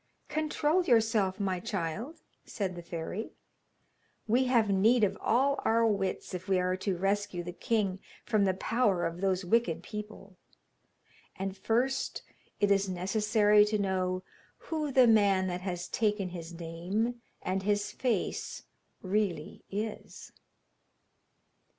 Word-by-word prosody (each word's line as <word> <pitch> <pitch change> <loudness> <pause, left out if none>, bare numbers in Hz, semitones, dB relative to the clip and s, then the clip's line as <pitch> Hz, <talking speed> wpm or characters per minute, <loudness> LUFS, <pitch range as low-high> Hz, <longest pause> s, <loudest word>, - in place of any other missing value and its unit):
'Control 310 +3 +1
yourself, 220 - +2
my 190 -3 0
child,' 210 - -4 0.2
said 190 -4 -3
the 175 - -7
fairy. 170 +5 -5 0.9
'We 245 +4 +3
have 240 -4 +3
need 220 +5 +4
of 205 - +2
all 275 +4 +2
our 230 +1 +3
wits 195 -3 -1
if 180 +1 -5
we 190 -1 +3
are 180 0 +1
to 185 -1 -2
rescue 195 -1 -1
the 175 - -5
king 200 -2 0 0.3
from 215 -3 +2
the 190 -1 +1
power 205 -3 +1
of 165 +2 -4
those 190 -1 +1
wicked 175 -5 +1
people. 210 -3 -8 1.0
And 195 0 -4
first 245 +7 0 0.4
it 205 0 +3
is 195 -1 +3
necessary 210 +3 +3
to 215 0 0
know 185 -2 -1 0.3
who 310 -3 -3
the 260 -1 +6
man 200 -4 +4
that 180 0 -3
has 180 -2 -4
taken 210 -4 0
his 170 -1 -7
name 180 +8 -3 0.2
and 190 +1 -1
his 205 +1 0
face 240 -7 -2 0.4
really 190 -5 -1
is.' 215 +2 -5
200 Hz, 130 wpm, -30 LUFS, 185-225 Hz, 1.0 s, the